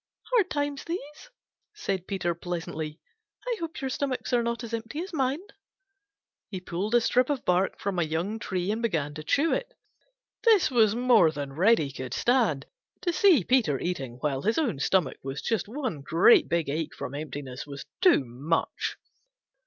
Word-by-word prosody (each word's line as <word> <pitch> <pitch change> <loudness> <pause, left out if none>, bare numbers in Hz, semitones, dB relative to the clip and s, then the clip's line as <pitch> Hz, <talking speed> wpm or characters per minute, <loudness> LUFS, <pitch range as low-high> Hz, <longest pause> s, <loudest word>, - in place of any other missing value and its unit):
"Hard 420 -7 +4
times 290 -1 -2
these," 330 - -6 0.5
said 190 - -3
Peter 180 -3 -1
pleasantly. 165 -3 -5 0.5
"I 485 -2 -1
hope 330 -2 -5
your 265 - -2
stomachs 265 -1 -2
are 240 - +4
not 235 +1 -2
as 230 -1 -7
empty 230 +6 -4
as 375 - -9
mine." 275 +3 0 1.1
He 190 - -5
pulled 185 +5 -2
a 240 - +6
strip 245 +3 +2
of 285 -3 -2
bark 180 +2 +1
from 195 -3 -2
a - - +3
young 170 +8 -2
tree 185 -2 -2
and 220 +2 -2
began 160 -11 -1
to 155 +1 -7
chew 290 - +2
it. - - -2 0.7
This 435 - +5
was 220 -4 +4
more 240 -8 +5
than 145 -3 -5
Reddy 170 -3 +3
could 130 -2 -5
stand. 230 - +2 0.4
To 345 - 0
see 335 - +5
Peter 220 - +2
eating 140 -9 -3
while 140 -3 -1
his 220 +7 +1
own 245 - 0
stomach 165 -1 +1
was 135 +1 -5
just 225 -3 -1
one 240 - -4
great 165 +10 +5
big 170 -1 +1
ache 155 +2 -3
from 125 - -6
emptiness 145 -3 -6
was 140 -1 -8 0.2
too 365 - +5
much. 140 +8 -2
200 Hz, 175 wpm, -27 LUFS, 155-260 Hz, 1.1 s, a